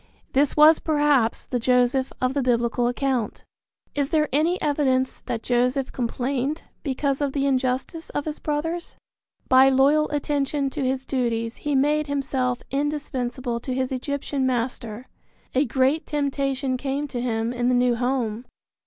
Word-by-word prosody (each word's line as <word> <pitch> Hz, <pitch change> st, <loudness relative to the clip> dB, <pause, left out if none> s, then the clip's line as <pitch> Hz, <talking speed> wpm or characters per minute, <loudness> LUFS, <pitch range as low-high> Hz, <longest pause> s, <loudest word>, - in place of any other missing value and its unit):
This 280 Hz, +2 st, +2 dB
was 305 Hz, +1 st, +7 dB
perhaps 290 Hz, -7 st, +2 dB
the 250 Hz, -, -2 dB
Joseph 250 Hz, +2 st, +2 dB
of 255 Hz, 0 st, 0 dB
the 280 Hz, -, 0 dB
Biblical 240 Hz, -1 st, +1 dB
account. 245 Hz, -3 st, -1 dB, 0.5 s
Is 285 Hz, -1 st, -1 dB
there 305 Hz, -1 st, +2 dB
any 325 Hz, +6 st, +2 dB
evidence 265 Hz, -3 st, 0 dB
that 230 Hz, -1 st, -3 dB
Joseph 250 Hz, +2 st, +1 dB
complained 260 Hz, +4 st, -2 dB, 0.2 s
because 275 Hz, 0 st, -1 dB
of 280 Hz, -2 st, 0 dB
the 275 Hz, -1 st, 0 dB
injustice 265 Hz, +4 st, -1 dB
of 290 Hz, -, -3 dB
his 310 Hz, -1 st, -4 dB
brothers? 325 Hz, +3 st, -3 dB, 0.5 s
By 260 Hz, +1 st, +7 dB
loyal 280 Hz, +3 st, +4 dB
attention 285 Hz, -1 st, -1 dB
to 285 Hz, +1 st, -3 dB
his 260 Hz, 0 st, -1 dB
duties 230 Hz, -3 st, -1 dB
he 295 Hz, -1 st, -2 dB
made 300 Hz, +3 st, +2 dB
himself 265 Hz, -3 st, -1 dB
indispensable 260 Hz, -4 st, -2 dB
to 255 Hz, +2 st, -4 dB
his 260 Hz, 0 st, -1 dB
Egyptian 280 Hz, +1 st, -2 dB
master. 240 Hz, -2 st, -3 dB, 0.5 s
A 270 Hz, +3 st, +3 dB
great 265 Hz, +5 st, +1 dB
temptation 275 Hz, -2 st, -1 dB
came 280 Hz, +2 st, -2 dB
to 245 Hz, -2 st, -3 dB
him 230 Hz, -1 st, -1 dB
in 245 Hz, 0 st, 0 dB
the 250 Hz, -, +3 dB
new 245 Hz, 0 st, +3 dB
home. 245 Hz, -2 st, -1 dB
265 Hz, 150 wpm, -24 LUFS, 250-290 Hz, 0.5 s, was